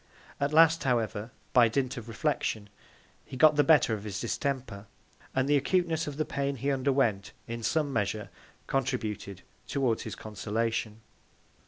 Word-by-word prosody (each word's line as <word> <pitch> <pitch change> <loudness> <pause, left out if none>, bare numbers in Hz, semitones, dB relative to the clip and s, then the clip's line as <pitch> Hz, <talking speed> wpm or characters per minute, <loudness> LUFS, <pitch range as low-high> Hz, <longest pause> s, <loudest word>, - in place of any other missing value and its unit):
At 140 +1 0
last, 165 +1 +5
however, 115 -4 0 0.2
by 120 -2 +7
Dint 130 +2 -1
of 115 -2 -8
Reflection, 110 -4 -2 0.5
he 130 - -9
got 155 +3 +6
the 145 - +4
better 145 -5 +5
of 105 -2 -4
his 100 -2 -4
Distemper; 115 -3 -3 0.5
and 130 0 +2
the 145 - +4
Acuteness 165 +2 +1
of 145 -1 -5
the 155 - 0
Pain 140 -1 -2
he 135 +3 -1
underwent, 130 -7 +1
in 115 0 -5
some 145 +4 0
Measure, 105 -1 -2 0.3
contributed 110 -8 -3 0.2
towards 130 -5 0
his - - -6
Consolation. 110 +1 -3
125 Hz, 150 wpm, -29 LUFS, 110-140 Hz, 0.5 s, by